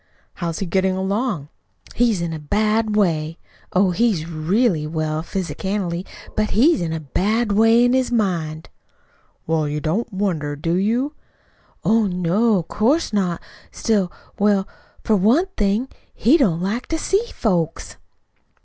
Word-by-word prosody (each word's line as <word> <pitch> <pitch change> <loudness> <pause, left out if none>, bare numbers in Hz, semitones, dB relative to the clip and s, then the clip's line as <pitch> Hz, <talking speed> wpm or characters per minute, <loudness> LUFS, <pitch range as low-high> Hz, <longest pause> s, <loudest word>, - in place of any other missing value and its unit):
"How 170 -2 -3
is 165 - -4
he 195 - -2
getting 190 +2 +1
along?" 190 - -2 0.4
"He's 230 -6 +2
in 165 -1 -3
a 160 - -5
bad 215 +6 0
way. 165 -5 +1 0.3
Oh, 185 0 +3
he's 185 -5 +1
real 165 +1 0
well 155 -1 -2
physicianally, 185 0 -3 0.3
but 215 0 +1
he's 255 - +3
in 165 -2 -2
a 160 - -2
bad 205 - 0
way 225 +3 +5
in 245 - +3
his 260 -1 +1
mind." 170 -9 -1 0.8
"Well, 160 -2 0
you 150 +1 -2
don't 170 +11 -1
wonder, 175 -7 -2
do 165 +3 -2
you?" 230 - 0 0.7
"Oh, 220 -1 +3
no, 185 +3 +1
'course 235 - +1
not. 180 -4 0 0.3
Still, 200 -5 0 0.3
well, 200 -2 +2 0.4
for 220 - +2
one 230 - +4
thing, 210 +4 +1 0.3
he 250 +8 +4
don't 190 - +2
like 210 +7 -2
to 325 - -1
see 390 +6 +1
folks." 170 -7 -1
195 Hz, 145 wpm, -21 LUFS, 165-225 Hz, 0.8 s, way